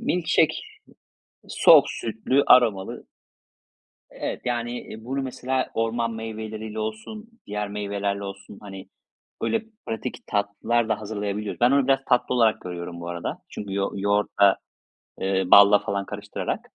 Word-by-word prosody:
milk 180 -7 -1
shake, 155 -1 +4 0.9
soğuk - - +7
sütlü 115 +5 0
aromalı 110 -7 +4 1.1
E - - -15
evet. - - -4
Yan,i 120 -2 -4
bunu 135 +2 -2
mesela 130 0 -2
orman 115 +1 -1
meyveleriyle 110 -1 -6
olsun 110 - -6 0.2
diğer 105 0 -3
meyvelerle 100 -1 -3
olsun, 100 +1 -9
hani, 95 -2 -10 0.5
böyle 225 0 0 0.2
pratik 110 -1 -5
tatlılar 110 +3 0
da - - 0
hazırlayabiliyoruz. 105 0 -4
Ben 120 +1 +5
onu 140 -1 +3
biraz 135 0 +4
tatlı 125 0 +2
olarak 115 -3 +3
görüyorum 85 -1 -6
bu 85 - -7
arada 85 -1 -5
çünkü 100 -2 -6
yoğu 100 0 -2
yoğurtla, 100 0 +3 0.6
eee, 95 0 +1
balla 100 0 +8
falan 100 -1 -3
karıştırarak 105 0 -4
110 Hz, 135 wpm, -24 LUFS, 100-120 Hz, 1.1 s, balla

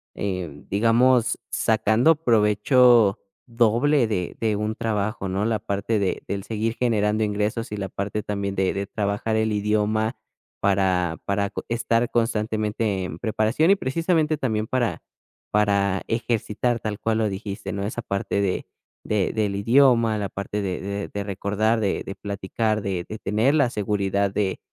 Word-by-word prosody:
em, 90 -8 -4
digamos, 115 +4 +3
sacando 110 +7 +3
provecho 115 0 +4 0.3
doble 120 +4 +3
de 90 -5 -3
de 110 -2 +1
un 105 +1 -2
trabajo, 110 -2 -2
¿no? 95 +3 -1
La 115 -1 +1
parte 100 +3 -1
de 95 -2 -1
del 100 -1 -3
seguir 110 +1 -2
generando 110 -3 +1
ingresos 105 +2 -2
y 105 - -3
la 95 -1 -4
parte, 100 +3 -3
también, 100 -1 -3
de 95 -1 +1
de 100 0 -2
trabajar 105 +1 -1
el 110 0 +1
idioma 105 +2 0 0.5
para 95 -4 +1
para 100 0 0
co - - -6
estar 115 0 +1
constantemente 110 -3 0
en 80 -3 -6
preparación. 115 - +2
Y, - - +6
precisamente, 160 +1 0
también 110 -5 -1
para 120 -2 -1 0.5
para 100 -2 +2
ejercitar 115 0 -1
tal 105 -1 -4
cual 110 -1 0
lo 110 - +1
dijiste, 100 0 -5
¿no?, 100 0 -3
Esa 120 - -4
parte 100 0 -2
de 95 -2 -1 0.4
de 105 -3 0
del 105 -3 0
idioma, 115 +1 +4
la 100 - -3
parte 100 +2 -4
de 95 -2 -3
de 100 +1 -4
de 100 0 -4
recordar, 105 +3 0
de 100 - -1
de 95 - -5
platicar, 100 +2 -2
de 95 -3 -2
de 110 - -5
tener 110 +8 +1
la 140 -5 +3
seguridad 100 -1 0
de 100 -2 -1
105 Hz, 160 wpm, -24 LUFS, 100-115 Hz, 0.5 s, Y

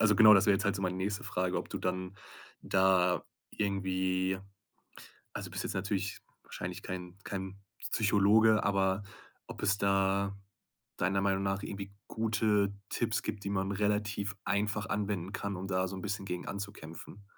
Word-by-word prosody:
also 105 -2 +5
genau, 110 -2 +10
das 100 +2 +5
wäre 100 - +6
jetzt 100 +3 -1
halt 100 - +2
so 95 - -3
meine 90 0 0
nächste 100 +2 -2
Frage, 90 0 -1
ob - - -6
du - - -4
dann 90 +1 -3 0.4
da 95 -2 +3 0.3
irgendwie 95 -2 0 0.9
also - - -5
du - - -16
bist - - -2
jetzt - - -3
natürlich 95 0 -1 0.2
wahrscheinlich - - -6
kein 90 -1 -6
kein 95 0 -5 0.4
Psychologe, 110 0 +5
aber 95 0 +2 0.4
ob - - -8
es 100 0 +2
da 100 0 +2 0.6
deiner 95 +2 +1
Meinung 95 0 +1
nach 95 0 0
irgendwie 100 0 -6 0.2
gute 110 -2 +2 0.2
Tipps 115 -3 0
gibt, 100 -1 -4
die 100 - -2
man 95 0 0
relativ 105 0 0
einfach 105 +2 0
anwenden 100 -4 -2
kann, 100 -3 -3
um 95 +2 -5
da 95 -1 +1
so 95 - -5
'n 95 - -6
bisschen 100 0 -3
gegen 90 -2 -4
anzukämpfen. 100 -1 -7
100 Hz, 165 wpm, -32 LUFS, 95-105 Hz, 0.9 s, genau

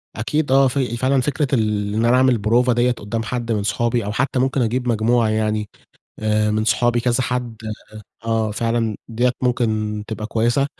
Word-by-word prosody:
أكيد 145 +6 -1
آه، 135 0 +5
في 125 -2 -1
فعلًا 130 +1 +2
فكرة 145 +1 -1
ال 105 -3 0
إن 110 +2 +1
أنا 120 +2 +4
أعمل 130 -2 +4
بروفة 120 +4 +2
دِيَّة 120 +1 +2
قدّام 115 -1 -4
حد 120 0 -3
من 105 -2 0
صحابي، 115 +2 0
أو 105 - -2
حتّى 130 +3 0
ممكن 130 +1 +1
أجيب 125 +2 -1
مجموعة 115 0 +2
يعني 110 -1 -1 0.5
آآ، 105 0 +1
من 110 +1 0
صحابي 120 +2 +2
كذا 125 +1 +1
حد 120 -2 -3 0.7
آه، 115 -1 0
فعلًا 115 0 -1
دِيَّة 120 +2 +1
ممكن 110 -4 0
تبقى 110 -1 -5
كويّسة، 120 +5 +1
115 Hz, 180 wpm, -20 LUFS, 110-125 Hz, 0.7 s, آه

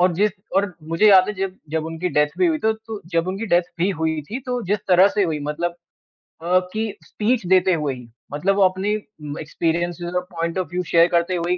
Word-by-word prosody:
और 180 0 +4
जिस 205 +4 +2 0.3
और 195 -2 +1 0.2
मुझे 165 +6 +4
याद 190 -2 +7
है 195 -2 -2 0.2
जब 160 0 -1
उनकी 165 +2 -3
डेथ 150 -2 +2
भी 365 - +4
हुई, 315 -2 +1
तो 220 -3 +2
तो 220 -1 -8
जब 165 +2 +1
उनकी 195 +4 -3
डेथ 175 -1 +4 0.2
भी 180 +4 +2
हुई 160 -1 0
थी, 250 - -3
तो 250 -1 -2
जिस 210 - +2
तरह 185 +2 +6
से 205 - 0
हुई 160 -3 -1
मतलब 170 +3 -3 0.7
अ, 180 +2 +3
कि 215 -1 -2
स्पीच 225 -1 -1
देते 185 0 +4
हुए 150 -4 -1
ही, 125 -2 -12 0.3
मतलब 195 +7 +1
वो 200 - +4
अपनी 190 +2 +1 0.5
एक्सपीरियंसज़ 170 +2 -2
और - - +1
पॉइंट 170 +1 -3
ऑफ 180 - -2
व्यू 180 +1 -1
शेयर 170 0 +4
करते 170 +1 +1
हुए 170 0 -1
ही 180 - +2
180 Hz, 225 wpm, -22 LUFS, 165-200 Hz, 0.7 s, याद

